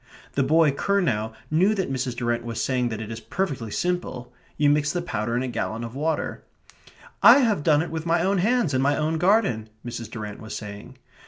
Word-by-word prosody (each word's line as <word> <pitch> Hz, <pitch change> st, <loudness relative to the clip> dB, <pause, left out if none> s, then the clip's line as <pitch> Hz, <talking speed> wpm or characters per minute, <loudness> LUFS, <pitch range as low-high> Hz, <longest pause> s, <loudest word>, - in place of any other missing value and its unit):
The 140 Hz, -, +1 dB
boy 155 Hz, +2 st, +4 dB
Curnow 140 Hz, -, 0 dB, 0.2 s
knew 185 Hz, +7 st, +3 dB
that 190 Hz, -8 st, -2 dB
Mrs. 130 Hz, -2 st, -2 dB
Durrant 120 Hz, -1 st, -1 dB
was 115 Hz, -1 st, -5 dB
saying 125 Hz, -2 st, 0 dB
that 110 Hz, -1 st, -5 dB
it 110 Hz, -, -8 dB
is 110 Hz, -, -5 dB
perfectly 140 Hz, -, -3 dB
simple; 175 Hz, -4 st, -3 dB, 0.2 s
you 150 Hz, -, +3 dB
mix 150 Hz, +1 st, +3 dB
the 175 Hz, -, -1 dB
powder 115 Hz, -9 st, -2 dB
in 125 Hz, -, 0 dB
a -, -, -2 dB
gallon 115 Hz, -2 st, -3 dB
of 115 Hz, 0 st, -6 dB
water; 155 Hz, +4 st, -2 dB, 0.8 s
"I -, -, +9 dB
have 220 Hz, -, +2 dB
done 150 Hz, 0 st, +3 dB
it 175 Hz, -, -7 dB
with 160 Hz, 0 st, -4 dB
my 165 Hz, 0 st, +2 dB
own 195 Hz, +1 st, +2 dB
hands 220 Hz, -, +2 dB
in 130 Hz, -, +2 dB
my 140 Hz, +2 st, +2 dB
own 155 Hz, +1 st, 0 dB
garden," 180 Hz, -, +2 dB, 0.2 s
Mrs. 115 Hz, -2 st, -6 dB
Durrant 105 Hz, -3 st, -7 dB
was 110 Hz, 0 st, -7 dB
saying. 105 Hz, +4 st, -9 dB
140 Hz, 210 wpm, -24 LUFS, 115-170 Hz, 0.8 s, I